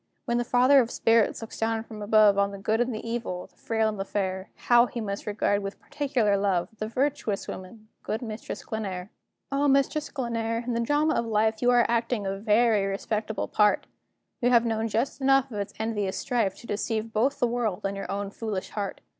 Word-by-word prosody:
When 240 -1 +1
the - - +1
Father 255 +4 +5
of 235 -3 +2
Spirits 225 -1 +2
looks 225 - -9
down 225 0 0
from 220 -2 -10
above 210 -1 +5
On 200 0 +2
the 200 - -7
good 220 +4 0
and 245 +1 0
the 220 0 -5
evil, 230 -6 -3
the - - -24
frail 220 -1 0
and 215 -2 -3
the - - 0
fair, 190 -1 -3 0.2
How 240 0 +5
must 205 -4 -3
he - - -3
regard, 205 0 +1
with 195 0 -6
particular 250 -8 0
love, 195 -3 0
This 215 +1 -4
virtuous 260 -5 -1
woman 215 +4 -9
good 220 +3 -3
Mistress 220 -1 -6
Glenare! 195 -3 -5 0.4
O, 280 +1 +2
Mistress 275 +2 +2
Glenare! 230 -3 -2
in 245 - -1
the 230 - 0
drama 295 +6 +2
of 235 - 0
life 220 0 +1
You 245 - +3
are 245 -2 +5
acting 230 -2 0
a 195 0 -1
very 210 0 +3
respectable 215 +2 -2
part; 210 -1 +3 0.6
You 245 - +3
have 235 -1 +5
known 225 -1 0
just 230 +6 -1
enough 270 0 +3
of 210 - -4
its 200 - -5
envious 210 -3 -2
strife 225 -6 0
To - - -14
deceive 220 +1 -2
both 260 +6 +1
the - - +2
world 235 -5 -1
and 195 0 -1
your 195 - -6
own 200 0 -3
foolish 205 -4 -4
heart. 200 -2 -4
220 Hz, 210 wpm, -27 LUFS, 205-240 Hz, 0.6 s, Father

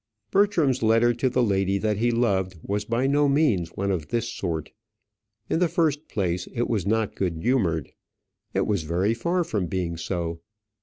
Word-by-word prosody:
Bertram's 180 -10 +3
letter 115 +2 +4
to 130 +2 0
the 125 0 +2
lady 100 -2 +1
that 105 +1 0
he 120 +3 +2
loved 95 -6 +1
was 105 +1 -2
by 115 +4 0
no 145 +1 +3
means 130 - +2
one 100 +1 -1
of 85 -5 -2
this 115 -1 -1
sort. 85 -8 -4 0.8
In - - 0
the 180 - +3
first 160 -3 0
place, 90 -3 -2
it 120 0 0
was 100 -5 -1
not 110 0 +1
good 90 -3 -1
humoured; 85 - 0 0.6
it - - +2
was 100 -5 0
very 90 +7 0
far 170 +10 0
from 105 - -2
being 85 -2 -2
so. 85 -1 -3
110 Hz, 175 wpm, -25 LUFS, 95-130 Hz, 0.8 s, letter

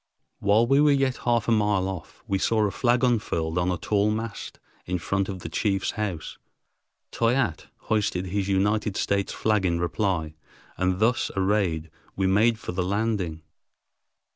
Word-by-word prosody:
While 105 +3 +4
we 135 +4 +4
were 150 - +5
yet 135 -2 +1
half 120 -3 +2
a - - +2
mile 105 -4 +2
off, 95 -5 -7
we 95 -1 0
saw 110 +1 +2
a 100 - 0
flag 120 +2 +1
unfurled 90 -9 0
on 90 +1 +1
a 90 - -1
tall 105 +5 +1
mast 110 0 -4 0.3
in 90 0 0
front 95 +3 -1
of 95 -2 -5
the - - -6
chief's 95 +3 0
house. 95 -7 -4 0.7
Toyatte 115 - 0
hoisted 100 -4 0
his 95 +1 -2
United 105 +1 +1
States 100 -1 0
flag 105 -3 +1
in 85 -2 +1
reply, 85 -3 -1 0.4
and 95 0 0
thus 115 +4 +2
arrayed 95 -5 0 0.2
we 95 - 0
made 110 +5 +3
for - - -6
the 90 +1 -2
landing. 95 -4 -1
100 Hz, 165 wpm, -25 LUFS, 90-110 Hz, 0.7 s, were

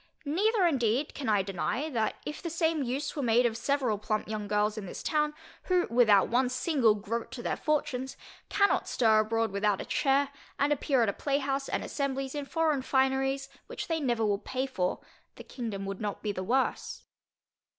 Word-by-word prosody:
Neither 390 +7 +2
indeed 265 -3 +1
can 275 -5 -3
I 205 -2 +3
deny, 195 - -2
that 220 -4 0
if 300 - -5
the 340 - -4
same 325 -1 +1
use 270 +2 -2
were 290 - -2
made 240 -1 +3
of 230 -2 +1
several 250 -3 0
plump 215 0 -2
young 210 -1 -4
girls 210 +1 +1
in 210 -3 -6
this - - -7
town, 300 -1 +1 0.3
who 360 -1 +2
without 220 -5 +5
one 250 +2 +2
single 255 -4 +2
groat 225 +3 -4
to 245 -2 -6
their - - -1
fortunes, 265 -4 -1 0.3
cannot 400 0 +2
stir 220 -3 +4
abroad 225 0 +1
without 200 0 +1
a - - -5
chair, 275 0 +2 0.3
and 290 +1 +3
appear 270 -3 +1
at 220 - +2
a - - -1
playhouse 275 +1 -1
and - - -1
assemblies 275 -2 -2
in 290 -1 -3
foreign 315 -2 +1
fineries 270 +1 +1 0.2
which - - -6
they 330 -1 0
never 240 -6 0
will 205 -1 +1
pay 255 +5 -2
for, 190 -9 -2 0.3
the - - -10
kingdom 220 -6 -5
would 195 +1 -5
not 205 -1 -4
be 210 - 0
the 185 - -4
worse. 255 +8 -1
255 Hz, 190 wpm, -29 LUFS, 215-285 Hz, 0.3 s, without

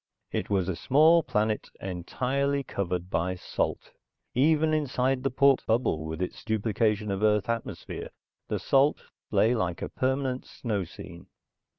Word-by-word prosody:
It - - -2
was 95 -3 +1
a 95 - -1
small 155 - +5
planet, 110 -6 -1
entirely 130 +10 -1
covered 90 -5 -3
by 85 +3 0
salt. 90 - -3 0.4
Even 155 +4 +3
inside 135 -3 +1
the 135 - 0
port 135 +1 +4
bubble 110 -9 +1
with 80 +3 -3
its 90 - -6
duplication 110 -1 0
of 95 0 -2
Earth 105 -1 +3
atmosphere, 115 -1 -4 0.4
the - - -1
salt 135 +2 +3 0.3
lay 115 +3 +3
like 90 -7 -1
a - - -3
permanent 130 0 -1
snow 105 -6 -3
scene. 85 0 -11
110 Hz, 145 wpm, -28 LUFS, 95-135 Hz, 0.4 s, small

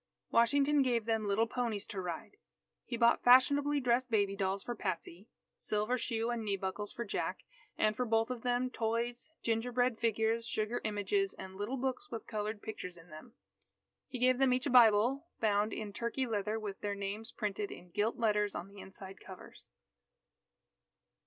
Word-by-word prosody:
Washington 280 +5 +4
gave 240 -4 +1
them 225 -2 0
little 205 +3 +3
ponies 230 -4 -2
to 200 -4 -5
ride. 175 -3 -6 0.5
He 235 - -3
bought 235 0 +4
fashionably 285 +3 +5
dressed 250 0 +1
baby 200 -3 +2
dolls 195 0 -1
for 240 - -3
Patsy, 185 -1 -5 0.3
silver 215 +4 0
shoe 230 -1 -1
and 235 -2 -2
knee 200 -2 0
buckles 195 +2 -4
for 235 - -5
Jack, 200 - -3 0.3
and 215 0 +2
for 250 - 0
both 225 0 +1
of 245 -2 -4
them 245 +1 0
toys, 235 +4 -2
gingerbread 240 +1 +1
figures, 225 0 +1
sugar 220 +1 -1
images, 215 - 0
and 190 0 -9
little 205 +7 -3
books 265 +10 -3
with 225 - -6
coloured 215 -1 -4
pictures 180 -5 -6
in 165 +1 -16
them. 155 +10 -12 0.7
He 255 - -5
gave 255 +1 +3
them 265 -2 +4
each 255 0 0
a - - 0
Bible 245 +5 +5
bound 210 0 +2
in 210 -1 -5
turkey 235 +5 -2
leather 215 -1 -1
with 205 -3 -6
their 205 -1 -2
names 200 +3 -4
printed 210 -1 -3
in 175 0 -11
gilt 210 +5 0
letters 210 -3 +1
on 180 - -5
the 200 0 -13
inside 190 0 -9
covers. 190 -2 -12
225 Hz, 170 wpm, -33 LUFS, 205-245 Hz, 0.7 s, fashionably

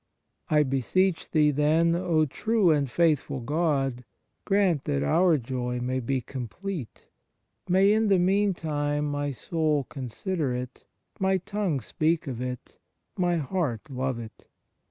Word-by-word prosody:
I 150 -1 +4
beseech 160 +7 0
Thee, 150 -1 +3
then, 155 +4 +3
O 165 -3 +2
true 205 - +2
and 145 -3 +1
faithful 150 -2 +1
God, 135 -2 0 0.4
grant 195 -7 +2
that 70 0 0
our 170 - +4
joy 125 -1 -3
may 130 +1 -1
be 130 +1 -1
complete. 135 - -6 0.6
May 195 +3 +5
in 220 0 +2
the 195 -2 +4
meantime 165 -6 +1
my 145 0 -2
soul 150 +1 0
consider 135 - -3
it, 125 0 -7 0.3
my 190 0 +2
tongue 185 -6 -2
speak 160 +7 0
of 125 -4 -5
it, 125 -1 -6 0.4
my 175 -1 +1
heart 150 - -2
love 130 -1 -2
it. 115 -2 -10
150 Hz, 135 wpm, -27 LUFS, 130-175 Hz, 0.6 s, May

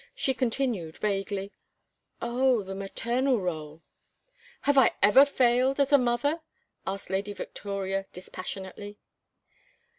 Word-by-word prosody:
She 265 - +1
continued, 235 - -1
vaguely, 200 -1 -2 0.7
"Oh, 245 -1 +2
the 195 0 -6
maternal 235 +7 0
rôle 160 -5 -4 0.4
" 485 -1 -29
"Have 285 0 +3
I 265 -3 +6
ever 235 +7 +8
failed 260 0 +2
as 280 +1 +2
a 285 - +8
mother?" 250 +6 +1 0.5
asked 195 -1 -4
Lady 200 +2 -1
Victoria, 195 -1 -4
dispassionately. 190 +2 -7
215 Hz, 115 wpm, -28 LUFS, 195-265 Hz, 0.7 s, ever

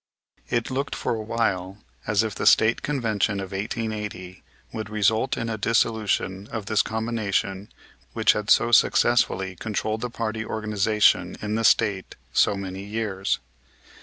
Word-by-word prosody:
It 120 +1 -1
looked 135 +2 -2
for - - -2
a 110 - -3
while 100 -4 -1 0.3
as 105 +1 +2
if 110 -2 -3
the - - -1
State 110 +1 +5
Convention 110 -7 -1
of 95 -1 -6
1880 105 -2 -4 0.3
would 110 -1 -5
result 110 +3 +1
in 115 - -3
a 110 -1 -3
dissolution 105 -3 0
of 115 -3 -4
this 110 0 +2
combination 110 -3 -2 0.4
which - - +4
had 105 0 -4
so 120 - +4
successfully 95 -5 +3
controlled 110 +2 -3
the 125 - -2
party 110 -1 -3
organization 105 -1 +1
in 105 0 -3
the 115 +1 0
State 100 -4 +2 0.2
so 100 - +3
many 95 0 -6
years. 100 -2 -2
110 Hz, 145 wpm, -24 LUFS, 100-115 Hz, 0.4 s, State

